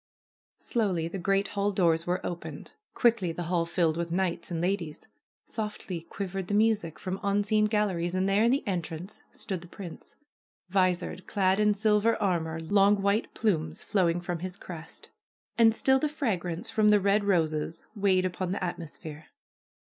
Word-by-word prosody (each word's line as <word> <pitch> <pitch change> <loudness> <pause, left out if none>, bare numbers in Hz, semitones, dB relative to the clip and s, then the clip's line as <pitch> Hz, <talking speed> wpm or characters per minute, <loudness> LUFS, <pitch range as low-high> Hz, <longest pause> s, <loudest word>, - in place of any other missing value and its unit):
Slowly 190 -9 -1
the 190 +3 -5
great 195 +2 +1
hall 200 0 0
doors 170 -4 +2
were 180 +1 -1
opened. 175 -1 -6 0.2
Quickly 230 -8 +3
the 175 +1 -4
hall 170 0 0
filled 170 -2 +1
with 170 0 -2
knights 175 -1 -1
and 170 -2 -2
ladies. 175 -3 -2 0.4
Softly 210 -5 -5
quivered 190 +2 -5
the 205 - 0
music 210 -7 +2
from 190 0 -4
unseen 205 +1 +2
galleries, 195 -5 0
and 185 +1 +1
there 195 +2 +3
in 230 - +4
the 270 +2 +1
entrance 175 0 -4
stood 190 -3 -4
the 175 - -11
prince, 175 -1 -10 0.5
visored, 185 -1 0
clad 190 0 +2
in 210 -1 +3
silver 215 +2 +2
armor, 165 -5 0
long 200 +4 +3
white 200 +2 +1
plumes 160 -6 0
flowing 175 -4 +1
from 175 -1 -4
his 185 +2 -6
crest. 165 -4 -10 0.4
And 225 -1 +5
still 265 +2 +4
the 300 - 0
fragrance 185 - -1
from 215 -1 +4
the 210 0 +6
red 200 +2 +2
roses 160 -5 0
weighed 190 -3 +2
upon 185 0 -2
the 195 - -3
at 175 0 -2
mosphere. 155 -1 -9
185 Hz, 165 wpm, -28 LUFS, 170-205 Hz, 0.5 s, the